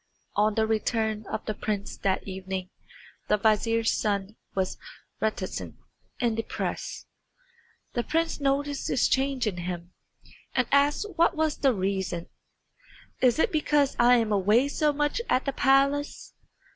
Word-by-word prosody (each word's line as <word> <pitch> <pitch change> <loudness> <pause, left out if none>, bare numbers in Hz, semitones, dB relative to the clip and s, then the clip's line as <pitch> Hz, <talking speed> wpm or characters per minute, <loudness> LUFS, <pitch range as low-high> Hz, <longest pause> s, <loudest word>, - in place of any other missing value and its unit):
On 210 +1 +2
the 220 - +2
return 220 -1 -1
of 220 - -4
the 215 - -2
prince 205 -1 -3
that 195 0 -1
evening 190 0 -5 0.6
the 210 - +3
vizier's 225 +2 +2
son 200 -1 -1 0.2
was 190 -1 -1 0.4
very 220 - +3
reticent 190 -3 -6 0.4
and 235 -3 +1
depressed. 225 - -4 0.9
The 240 - 0
prince 325 +6 -1
noticed 285 0 0
this 260 - +2
change 265 -2 +1
in 200 -5 -2
him, 175 0 -5 0.6
and 255 -2 +2
asked 285 +7 +3
what 340 +1 +4
was 315 -1 0
the 275 - +4
reason. 190 -3 -2 0.9
"Is 250 0 +4
it - - +2
because 295 -3 +2
I 240 +1 +7
am 225 -3 +1
away 210 +6 +3
so 300 +1 +2
much 295 +8 0
at 255 - +2
the 275 - -1
palace?" 275 +2 +2
225 Hz, 145 wpm, -27 LUFS, 200-280 Hz, 0.9 s, I